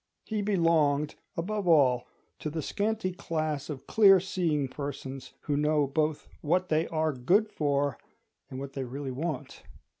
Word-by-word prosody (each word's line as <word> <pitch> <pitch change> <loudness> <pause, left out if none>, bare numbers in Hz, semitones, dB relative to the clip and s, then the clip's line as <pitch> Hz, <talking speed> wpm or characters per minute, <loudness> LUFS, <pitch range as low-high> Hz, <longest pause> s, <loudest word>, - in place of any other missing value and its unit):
He 215 -2 -2
belonged, 165 -7 +2 0.2
above 200 +3 -2
all, 135 -7 +4 0.3
to 155 - -3
the 160 0 -4
scanty 210 -2 -1
class 155 -4 -3
of 140 -3 -6
clear 195 -3 +6
seeing 165 -6 0
persons 135 -1 -6
who 145 - -1
know 150 0 +2
both 150 +2 -1
what 180 +4 +1
they 155 +1 +2
are 155 -1 0
good 180 - +3
for 140 -3 0 0.5
and 130 - -6
what 135 0 -6
they 135 - -3
really 135 +2 -5
want. 145 +1 -4
155 Hz, 150 wpm, -29 LUFS, 140-175 Hz, 0.5 s, clear